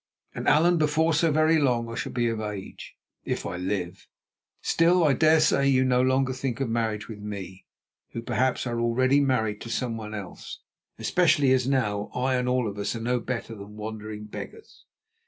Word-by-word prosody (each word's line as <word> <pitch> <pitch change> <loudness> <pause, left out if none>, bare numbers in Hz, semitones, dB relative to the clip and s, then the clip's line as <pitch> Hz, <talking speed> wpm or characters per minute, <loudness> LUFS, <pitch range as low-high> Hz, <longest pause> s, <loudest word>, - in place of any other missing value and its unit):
And, - - -5
Allan, 170 +3 +4
before 155 +2 +2
so 160 +1 +3
very 155 +1 +3
long 120 -5 +1
I 115 - -7
shall - - -4
be 120 -1 0
of 115 -1 -2
age, 105 -2 -7 0.3
if - - -3
I 90 - -4
live. 90 0 -4 0.5
Still 170 +2 +3
I 150 -3 +4
dare 155 +4 +4
say 140 -2 +3
you 130 -1 +3
no 125 -1 +3
longer 130 0 +2
think 130 -2 -3
of 135 - 0
marriage 110 -2 -1
with 110 -2 -8
me, 100 -3 -8 0.5
who, 115 - -5
perhaps, 125 +3 0
are 120 -1 -2
already 130 +4 +3
married 110 -7 0
to 115 - -7
someone 115 -2 -3
else, 100 -3 -8 0.4
especially 155 -6 +3
as 130 -1 +2
now 105 -6 0
I 130 +1 0
and 125 0 0
all 125 -2 +1
of 100 0 -6
us 100 +3 -2
are - - -4
no 120 +2 0
better 115 -1 -4
than 105 0 -11
wandering 110 0 -6
beggars. 440 - -10
120 Hz, 190 wpm, -26 LUFS, 110-135 Hz, 0.5 s, Allan